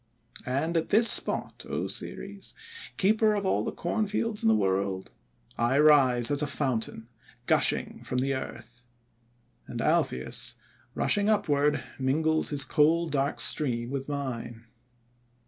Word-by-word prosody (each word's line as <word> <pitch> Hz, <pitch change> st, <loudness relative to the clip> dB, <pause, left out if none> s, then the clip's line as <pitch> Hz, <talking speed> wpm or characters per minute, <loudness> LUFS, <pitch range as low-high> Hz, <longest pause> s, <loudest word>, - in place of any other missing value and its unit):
"And 140 Hz, +7 st, -1 dB
at 160 Hz, -, -2 dB
this 225 Hz, +3 st, +7 dB
spot, -, -, +2 dB
O -, -, -2 dB
Ceres, -, -, -4 dB, 0.4 s
Keeper 215 Hz, +1 st, +2 dB
of 200 Hz, -1 st, -3 dB
all 105 Hz, -, +1 dB
the -, -, -3 dB
Corn 210 Hz, +5 st, -2 dB
Fields 215 Hz, +1 st, -1 dB
in -, -, +3 dB
the 110 Hz, -, +4 dB
World, 95 Hz, -1 st, -1 dB, 0.5 s
I 120 Hz, +3 st, +1 dB
rise 135 Hz, -5 st, +5 dB
as 145 Hz, 0 st, +2 dB
a 150 Hz, -, -1 dB
fountain, 115 Hz, -6 st, -2 dB, 0.4 s
gushing -, -, +1 dB
from 125 Hz, -, -4 dB
the 135 Hz, +2 st, 0 dB
earth. 120 Hz, -2 st, -8 dB, 0.8 s
And -, -, -7 dB
Alpheus, 65 Hz, 0 st, 0 dB, 0.4 s
rushing 205 Hz, +1 st, +1 dB
upward, 150 Hz, -10 st, +1 dB, 0.2 s
mingles 155 Hz, +4 st, +1 dB
his 145 Hz, -2 st, +1 dB
cold 160 Hz, +2 st, +2 dB
dark 140 Hz, 0 st, -1 dB
stream 120 Hz, -5 st, 0 dB
with 140 Hz, 0 st, -5 dB
mine.' 120 Hz, -5 st, -5 dB
140 Hz, 135 wpm, -27 LUFS, 120-165 Hz, 0.8 s, this